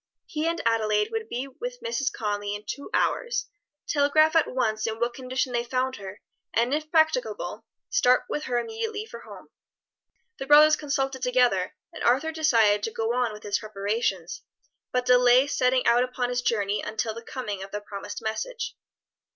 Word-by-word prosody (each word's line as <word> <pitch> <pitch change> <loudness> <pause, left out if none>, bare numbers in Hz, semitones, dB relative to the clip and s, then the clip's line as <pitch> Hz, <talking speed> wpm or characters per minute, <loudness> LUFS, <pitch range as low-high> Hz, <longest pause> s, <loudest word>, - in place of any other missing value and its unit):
He 310 +1 -2
and 335 0 -1
Adelaide 215 -2 +2
would 445 -1 -3
be 250 +3 -3
with - - -7
Mrs. 390 - -1
Conly 205 -1 -2
in 205 +1 -9
two 280 +5 -6
hours, 475 -1 0 0.4
telegraph 310 +2 +3
at 325 - +4
once 220 -4 0
in 220 0 -3
what 240 +1 0
condition 255 0 -2
they 235 0 +1
found 255 +1 -1
her, 195 0 -9 0.3
and 235 +4 +2
if 305 +1 -2
practicable 320 +11 +1 0.3
start 255 - +4
with 300 - -3
her 245 -1 -1
immediately 440 - -3
for - - -10
her - - -15
home. - - -12 0.9
The 270 - -5
brothers 300 +2 +8
consulted 270 -3 -2
together, 245 -7 +2 0.2
and - - -7
Arthur 270 +7 +3
decided 230 -10 +3
to 225 - -2
go 225 +1 -1
on 245 -2 +1
with 210 0 -10
his 205 -1 0
preparations, 200 -4 -2 0.5
but 250 0 0
delay 250 +1 +6
setting 255 -2 +1
out 235 +1 +5
upon 250 -1 -2
his 245 0 -1
journey 205 -4 0
until 220 0 -2
the 230 - -8
coming 215 -5 -5
of 195 - -7
the 210 - -4
promised 205 +2 -7
message. - - -3
250 Hz, 175 wpm, -26 LUFS, 220-300 Hz, 0.9 s, brothers